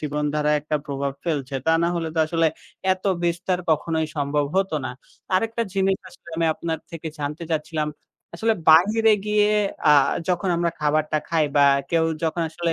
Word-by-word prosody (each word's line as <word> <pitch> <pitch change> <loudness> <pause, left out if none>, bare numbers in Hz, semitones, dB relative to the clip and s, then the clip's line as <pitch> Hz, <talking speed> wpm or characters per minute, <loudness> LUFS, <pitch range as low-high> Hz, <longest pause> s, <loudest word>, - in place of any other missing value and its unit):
জীবনধারায় 150 0 0
একটা 150 +1 -1
প্রভাব 140 -1 -2
ফেলছে। 140 -5 -2
তা 160 - +4
না 170 - +2
হলে 165 -1 -2
তো 165 - -2
আসলে, 165 0 +1 0.5
এতো 185 +1 -2 0.2
বিস্তার 175 +1 0
কখনোই 160 +1 +1
সম্ভব 145 0 0
হতো 190 -4 +1
না। - - -3 0.4
আরেকটা 225 +4 +1
জিনিস 195 0 +2
আসলে 170 - -18
আমি 165 0 +1
আপনার 165 0 -3
থেকে 165 -1 -6
জানতে 150 +3 -4
চাচ্ছিলাম। 155 -1 -1 0.5
আসলে 225 +6 +1 0.2
বাইরে 215 +7 +5
গিয়ে 210 0 +3 0.4
আ - - +8 0.4
যখন 180 +1 0
আমরা 170 0 +1
খাবারটা 155 0 +1
খাই, 160 -2 +2
বা 145 - +6 0.3
কেউ 165 -1 +3 0.2
যখন 165 +1 0
আসলে 170 0 -1
165 Hz, 165 wpm, -23 LUFS, 150-180 Hz, 0.5 s, আ